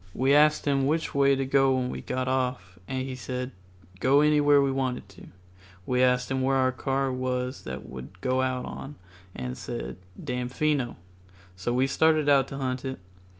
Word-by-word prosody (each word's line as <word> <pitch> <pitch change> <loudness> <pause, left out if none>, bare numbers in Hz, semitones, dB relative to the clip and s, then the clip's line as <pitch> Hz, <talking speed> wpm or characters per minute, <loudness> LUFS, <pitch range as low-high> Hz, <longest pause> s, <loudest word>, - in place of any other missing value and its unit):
We 135 +2 +3
asked 150 +1 +4
him 135 -2 +2
which 160 +2 0
way 140 0 +4
to 135 0 -1
go 135 0 +3
when 125 -1 -1
we - - -5
got 130 0 -3
off, 125 -9 -2
and 130 0 -2
he 135 - -5
said 125 0 -4 0.5
go 135 +6 +4
anyway 150 -1 +5
we 140 -1 +3
wanted 130 -5 -2
to. 100 - -14 0.6
We 125 0 +1
asked 125 0 +2
him 130 0 0
where 135 +1 +2
our 130 -1 +3
car 135 +1 -1
was 125 0 -3
that 65 +1 -6
we - - -12
would 65 +8 -9
go 130 +5 +1
out 130 -1 -1
on, 145 +2 -7 0.4
and 65 - -4
he - - -4
said, 60 0 -6 0.2
"Damfino." 125 0 -1 0.6
So 95 +6 -3
we 125 +2 +2
started 155 +2 +2
out 135 -2 +5
to 135 - -7
hunt 130 -1 -2
it. 130 -1 -4
130 Hz, 195 wpm, -27 LUFS, 125-135 Hz, 0.6 s, anyway